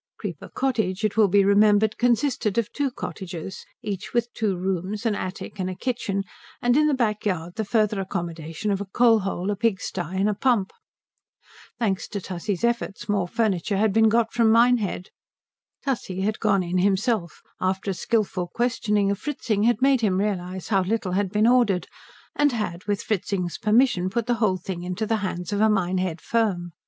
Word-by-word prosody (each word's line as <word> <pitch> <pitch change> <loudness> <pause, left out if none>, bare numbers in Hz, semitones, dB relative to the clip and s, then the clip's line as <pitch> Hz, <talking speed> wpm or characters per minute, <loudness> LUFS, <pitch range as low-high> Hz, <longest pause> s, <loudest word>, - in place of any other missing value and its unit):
Creeper - - -6
Cottage, 220 -6 -1
it 210 - -1
will 220 -2 +5
be 200 +1 +4
remembered, 210 +1 +4
consisted 245 -3 +1
of 230 -3 0
two 285 -1 0
cottages, 190 -6 -7 0.2
each 200 +2 -5
with 240 0 0
two 205 -4 -1
rooms, 190 +4 -3
an 225 - +2
attic, 195 +1 -6
and 185 0 -1
a 185 - -5
kitchen, 200 -4 -2 0.4
and 245 0 +2
in 305 +1 +4
the 295 - +2
back 215 -5 0
yard 175 -4 -2
the 220 - -2
further 215 -1 +1
accommodation 170 0 -4
of 195 0 -1
a - - -3
coal 225 +3 +4
hole, 195 0 -2
a - - -1
pig 210 -2 +1
stye, 180 0 -4
and 195 +2 +2
a 210 - +2
pump. 215 -2 +1 1.1
Thanks 200 -5 -1
to 205 - -4
Tussie's 185 +2 -4
efforts 235 -3 -1
more 200 -4 0
furniture 200 -2 0
had 210 0 +2
been 220 0 +5
got 225 0 +1
from 230 -2 +3
Minehead. 230 -5 +2 0.7
Tussie 210 -9 -2
had 215 +2 -1
gone 200 -4 +2
in 180 +1 -1
himself, 195 -1 0 0.2
after 190 +1 -1
a - - -1
skilful 185 -2 -1
questioning 210 -1 0
of 200 - -2
Fritzing 230 -6 -2
had 240 +2 +2
made 270 -2 +4
him 195 -4 +2
realize 190 -3 -3
how 195 -3 +3
little 195 0 -1
had 195 +1 0
been 210 +1 +2
ordered, 235 -7 +3 0.5
and 290 0 +3
had, 185 -6 -3
with 205 -2 -1
Fritzing's 180 -4 -2
permission, 215 -4 +3
put 235 +3 -1
the 245 - +1
whole 190 -4 +3
thing 180 0 -6
into 180 +4 -3
the 225 +1 +1
hands 185 -2 -4
of 205 - 0
a 220 - +5
Minehead 185 -4 0
firm. 195 -7 0
205 Hz, 190 wpm, -24 LUFS, 185-225 Hz, 1.1 s, will